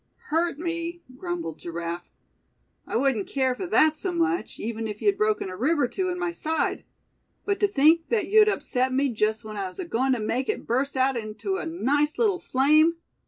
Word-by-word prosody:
"Hurt 330 -1 +1
me," 335 +1 -4
grumbled 345 - -5
Giraffe; 170 +1 -5 0.8
"I - - -4
wouldn't 240 -5 +1
care 260 -2 +1
for 360 +9 -5
that 315 -2 +4
so 370 +4 -2
much, 345 +1 -1
even 225 0 -3
if 210 -1 -6
you'd 405 -1 +2
broken 430 - 0
a 185 - -6
rib 295 - +1
or 260 - +3
two 370 +7 -2
in 360 - -3
my 355 -1 -1
side; 320 -1 -1 0.6
but 400 -1 0
to 410 - +4
think 320 -1 +4
that 420 -7 +1
you'd 425 +1 +6
upset 260 -9 0
me 275 +2 +1
just 220 -1 -1
when 215 -1 -7
I 195 -1 -2
was 185 - -11
agoin' 265 -7 0
to 250 - -1
make 245 +5 -2
it - - -2
burst 265 +4 -1
out 260 +1 +2
into 230 - -3
a 345 - -4
nice 295 -1 0
little 410 -6 +2
flame! 305 +5 +3
295 Hz, 200 wpm, -25 LUFS, 235-350 Hz, 0.8 s, you'd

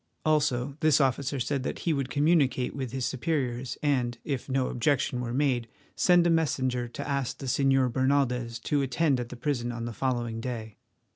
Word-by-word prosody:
Also 145 -3 +1
this 155 -2 +4
officer 135 0 +1
said 135 +2 -1
that - - -3
he 165 - +3
would 135 -3 -2
communicate 145 -2 +2
with 130 -4 -4
his 130 -1 -2
superiors, 130 -3 -2
and, 125 -5 +1
if 135 -4 -3
no 130 0 +1
objection 125 0 0
were 120 -1 -3
made, 125 -3 +1 0.3
send 175 -1 +4
a - - +4
messenger 130 -6 +1
to 120 - -7
ask 140 -3 -1
the 135 - -7
Señor 135 -1 +2
Bernaldez 125 -3 +1
to 145 -1 +1
attend 135 +1 +1
at 120 -1 -4
the 125 - -7
prison 120 -1 -2
on 115 -1 -5
the 120 - -5
following 120 -3 -2
day. 115 -4 -5
130 Hz, 185 wpm, -28 LUFS, 120-145 Hz, 0.3 s, this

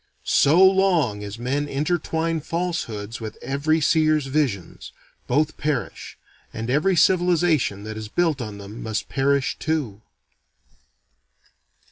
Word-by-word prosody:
So 155 +5 +4
long 180 - +3
as 100 +1 -7
men 135 +5 -2
interwine 160 +2 -1
falsehoods 130 - -4
with 110 -1 -7
every 140 +5 0
seer's 155 -1 +2
visions, 130 - -2 0.4
both 150 +4 +1
perish, 150 -3 -3 0.3
and 115 +2 -4
every 160 +8 +2
civilization 170 - +2
that 110 0 -6
is 110 -1 -6
built 160 +2 0
on 105 -3 -6
them 100 +2 -9
must 110 -1 -3
perish 140 0 +1
too. 140 -10 -2
145 Hz, 115 wpm, -23 LUFS, 110-160 Hz, 0.4 s, So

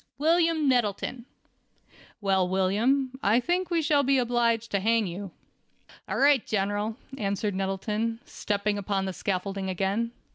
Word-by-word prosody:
"William 325 0 +2
Nettleton." 240 0 0 1.0
"Well, 190 -2 +2
William, 235 +8 +1
I 215 +4 +4
think 355 +6 -1
we 335 -2 +1
shall 290 -1 +3
be 275 0 +2
obliged 235 -2 +1
to 200 - +1
hang 225 +2 +2
you." 190 +2 -5 0.8
"All - - -1
right, 280 -3 +4
General," 205 +2 -1 0.2
answered 200 0 -1
Nettleton, 210 +4 -2
stepping 205 0 -2
upon 195 -1 -1
the 190 - -3
scaffolding 195 +1 -3
again. 195 +5 -1
215 Hz, 135 wpm, -27 LUFS, 195-260 Hz, 1.0 s, I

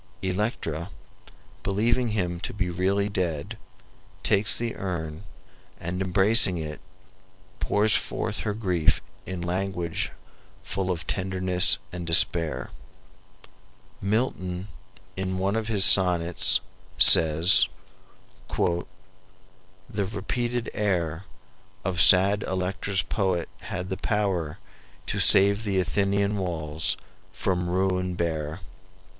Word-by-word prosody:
Electra, 90 -4 -2 0.7
believing 115 - +1
him 90 -6 -2
to - - -5
be 90 -3 -2
really 95 +3 0
dead, 85 -7 -3 0.7
takes 105 +1 +3
the 115 -1 -3
urn 85 -3 -5 0.6
and, 85 +2 -4
embracing 95 +1 +3
it, 75 -2 -6 0.8
pours 105 0 +2
forth - - -2
her 105 - -2
grief 90 -7 +1 0.3
in 95 -2 -5
language 90 -1 -2 0.5
full 95 -1 -3
of 90 -2 -2
tenderness 95 -1 +2
and 85 -1 -6
despair. 85 -1 +2 1.3
Milton, 100 -3 -2 0.5
in 95 0 -3
one 95 +3 0
of 110 -1 -2
his 100 -4 +4
sonnets, 90 -3 +4 0.4
says: 80 +3 +6 0.4
"... - - -29
The 85 0 0 1.3
repeated 120 +3 -3
air 90 -4 -1 0.6
Of 90 -2 +1
sad 100 +2 +6
Electra's 95 +1 -1
poet 95 -6 -1
had 90 0 -5
the 95 - -3
power 95 -7 -1 0.5
To - - -3
save 100 +2 +5
the 100 -3 0
Athenian 100 +3 0
walls 80 -5 -1 0.3
from 90 -2 -2
ruin 90 0 0
bare." 80 0 -3
95 Hz, 105 wpm, -25 LUFS, 85-100 Hz, 1.3 s, says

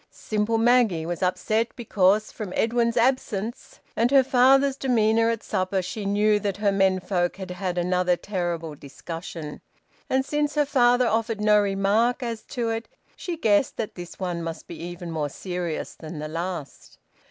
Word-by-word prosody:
Simple 215 +1 -1
Maggie 225 -8 +3
was 175 0 -4
upset 190 +5 0
because, 210 -2 +2
from 210 -5 -6
Edwin's 235 +1 +1
absence 235 -3 -1 0.2
and 230 +2 +2
her 275 0 +6
father's 270 +2 +4
demeanour 230 -4 +2
at 230 -2 -2
supper, 185 0 -1
she 200 +3 -4
knew 210 +1 +3
that 200 -2 -2
her 205 -1 +2
menfolk 185 -2 +1
had 190 -2 -7
had 180 -1 -3
another 180 0 +1
terrible 175 -5 -3
discussion. 155 +2 -8 0.5
And 265 0 +1
since 295 +1 -1
her 295 -1 +3
father 245 -2 +3
offered 225 -1 0
no 210 0 +5
remark 205 +6 +1
as 230 -2 -4
to 240 -4 -3
it, 225 0 -4 0.3
she 345 -2 -5
guessed 220 -4 +2
that 220 - -3
this 175 -1 -9
one 175 -3 -2
must 165 -1 -6
be 170 - -9
even 175 0 -6
more 155 -2 -2
serious 175 0 -4
that 155 0 -8
the 150 +1 -4
last. 165 -2 -6
205 Hz, 165 wpm, -25 LUFS, 180-230 Hz, 0.5 s, her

